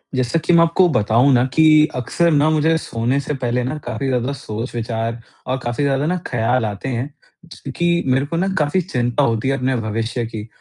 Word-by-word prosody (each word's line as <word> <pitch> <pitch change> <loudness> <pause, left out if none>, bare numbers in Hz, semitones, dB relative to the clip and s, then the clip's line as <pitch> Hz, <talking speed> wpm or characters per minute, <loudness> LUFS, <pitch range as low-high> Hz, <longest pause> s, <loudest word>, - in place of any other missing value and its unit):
जैसा 130 +5 0
कि 170 +2 +1
मैं 170 - +6
आपको 170 +2 +3
बताऊँ 120 0 +3
न 125 0 +3
कि 160 - +4 0.3
अक्सर 170 +7 0
न 145 -2 +3
मुझे 160 +1 +2
सोने 125 -2 -1
से 145 - -3
पहले 125 0 0
न 140 +5 -3
काफ़ी 120 +3 -3
ज़्यादा 130 +1 -1
सोच 115 -1 -6
विचार 115 0 -3 0.3
और 130 - -1
काफ़ी 120 +3 -2
ज़्यादा 140 0 +1
न 180 +2 0
ख़याल 120 0 0
आते 105 +5 -4
हैं 125 +2 -3 0.7
कि 175 0 +2 0.2
मेरे 135 +2 +2
को 165 +3 -4
न 190 +2 0
काफ़ी 150 +5 +1
चिंता 125 -6 -1
होती 115 -1 0
है 135 - 0
अपने 130 0 0
भविष्य 115 +1 -2
की 110 -1 -7
125 Hz, 205 wpm, -19 LUFS, 115-145 Hz, 0.7 s, मैं